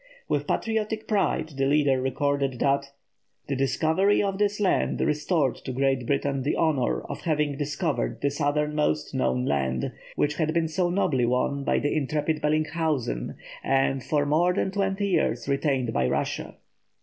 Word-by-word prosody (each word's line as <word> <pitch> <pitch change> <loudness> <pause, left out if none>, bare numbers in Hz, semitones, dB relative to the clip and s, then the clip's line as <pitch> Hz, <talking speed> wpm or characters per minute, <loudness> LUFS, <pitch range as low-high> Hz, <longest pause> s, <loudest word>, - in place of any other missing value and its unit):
With - - -1
patriotic 220 -1 -1
pride 195 -6 +1
the 135 0 +2
leader 140 -2 +3
recorded 140 0 0
that 140 +1 +1 0.6
"the 140 - -1
discovery 160 +9 +2
of 195 -1 -2
this 205 0 +1
land 200 -3 +1
restored 150 -2 +1
to 130 - -6
Great 135 -1 0
Britain 140 0 0
the 140 - 0
honour 150 -6 +1
of - - -7
having 150 -3 0
discovered 140 - -2
the 140 - 0
southernmost 150 - 0
known 65 -1 0
land, 65 -3 0 0.2
which 150 0 0
had 155 0 0
been 165 -1 +2
so 175 +2 0
nobly 145 -10 +1
won 130 +3 0
by - - +1
the 145 - 0
intrepid 155 +1 -1
Bellinghausen, 155 - -1 0.3
and 135 -1 +1
for 145 -2 +1
more 170 +5 +2
than 190 - 0
twenty 195 0 0
years 120 - 0
retained 140 -4 0
by 65 -1 +1
Russia." - - -2
145 Hz, 155 wpm, -26 LUFS, 135-160 Hz, 0.6 s, leader